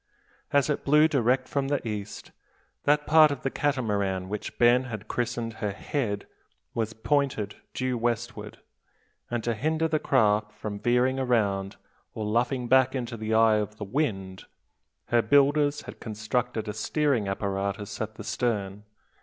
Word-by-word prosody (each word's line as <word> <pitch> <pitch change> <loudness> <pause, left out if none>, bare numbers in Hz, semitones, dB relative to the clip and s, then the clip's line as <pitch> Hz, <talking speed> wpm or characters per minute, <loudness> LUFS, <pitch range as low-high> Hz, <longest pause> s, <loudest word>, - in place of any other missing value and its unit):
As 140 -1 +3
it 150 - -1
blew 150 +2 +5
direct 130 -3 +1
from 140 -1 -1
the 140 -4 -1
east, 105 -1 -6 0.5
that 150 0 +3
part 155 0 +7
of 140 -3 -5
the 135 - -1
Catamaran 105 -10 -1
which 105 0 -5
Ben 120 +2 +5
had 110 -4 -7
christened 120 -1 -2
her 105 - 0
head 105 -2 -3 0.5
was 115 -1 -2
pointed 120 -4 -1 0.2
due 130 -2 -1
westward; 120 -2 -3 0.7
and 120 -2 -2
to 120 - 0
hinder 160 +7 0
the 155 -1 0
craft 105 -6 +2
from 105 -1 -6
veering 125 +3 +2
round, 105 -7 0 0.4
or 110 - -3
luffing 120 +3 0
back 130 +1 +4
into 120 -2 -3
the 110 0 -2
eye 110 -1 +5
of 105 0 -3
the 105 - -5
wind, 95 -6 -2 0.6
her 120 -1 +4
builders 145 +4 +3
had - - -10
constructed 110 +1 -2
a 105 - -3
steering 135 -1 0
apparatus 100 +1 -3
at 110 0 -4
the - - -8
stern. 105 -4 -2
120 Hz, 155 wpm, -27 LUFS, 105-135 Hz, 0.7 s, part